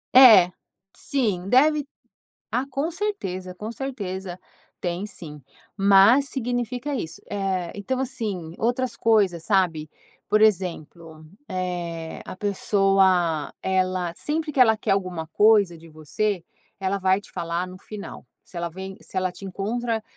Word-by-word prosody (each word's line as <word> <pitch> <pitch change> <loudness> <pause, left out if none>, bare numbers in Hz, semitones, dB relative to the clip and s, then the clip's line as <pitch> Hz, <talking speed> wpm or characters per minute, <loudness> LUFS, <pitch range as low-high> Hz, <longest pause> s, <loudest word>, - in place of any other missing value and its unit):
É, 220 -9 +9 0.4
sim, 210 -10 -1
deve 295 +3 +4 0.7
ah, 255 +2 0
com 280 +5 -2
certeza, 190 - -4
com 215 +4 -6
certeza 195 -9 -5 0.4
tem 175 +2 -2
sim, 155 -7 -8 0.3
mas 200 +8 +5
significa 245 +2 -2
isso. 165 - -5
Eh, 190 -3 -2
então, 230 +6 -3
assim, 200 -10 -4
outras 240 +1 0
coisas, 200 -8 +2
sabe? 170 -6 +1 0.4
Por 215 +1 +3
exemplo, 170 -5 0 0.2
eh, 175 -3 -4
a - - -7
pessoa 190 -5 +2
ela 185 -2 0
sempre 310 +1 -2
que 270 - -3
ela 220 -3 +6
quer - - -1
alguma 185 -4 -1
coisa 205 -1 +4
de 165 +1 -15
você, 170 +5 -2 0.4
ela 195 +1 0
vai 190 0 +2
te - - -16
falar 170 +2 -3
no 185 0 -10
final. 205 +1 -9 0.2
Se 180 - -11
ela 170 0 -2
vem, 190 +3 -8
se - - -8
ela 185 -1 0
te 195 - -13
encontra 220 +4 -2
195 Hz, 135 wpm, -24 LUFS, 180-230 Hz, 0.7 s, É